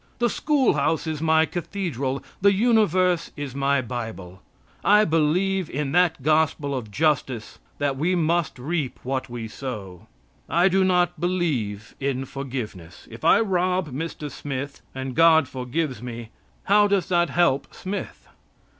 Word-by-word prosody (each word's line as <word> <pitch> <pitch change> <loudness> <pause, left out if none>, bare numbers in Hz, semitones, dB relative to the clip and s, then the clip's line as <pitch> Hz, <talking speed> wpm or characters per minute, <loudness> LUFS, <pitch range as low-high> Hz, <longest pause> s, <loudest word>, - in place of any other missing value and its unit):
The 240 -2 +1
school 290 -5 +2
house 160 +1 0
is 155 -2 -3
my 160 0 +4
cathedral. 160 - -3 0.2
The 200 +1 +6
universe 195 -5 +2
is 145 -3 -5
my 140 0 +1
Bible. 110 -6 -6 0.4
I 210 +1 +5
believe 170 +4 +1
in 140 0 -2
that 165 -4 +2
gospel 155 -1 +2
of 125 -5 -4
justice 130 -3 -1 0.2
that 140 -2 -1
we 175 +6 +1
must 170 -2 0
reap 145 +1 -3
what 130 0 -3
we 120 -2 -5
sow. 105 -7 -7 0.4
I 175 +3 +4
do 190 +1 +3
not 180 -1 +2
believe 135 - -1
in 135 -1 -1
forgiveness. 120 -11 -7
If 115 +1 -11
I - - +5
rob 185 -4 0
Mr. 150 +1 -5
Smith 140 0 -5
and 130 0 -4
God 160 -3 +6
forgives 130 0 -3
me, 120 -2 -7 0.3
how 205 +1 +5
does 200 -3 +1
that 175 -1 +2
help 155 -6 +1
Smith? 195 +2 -6
150 Hz, 145 wpm, -24 LUFS, 130-180 Hz, 0.4 s, The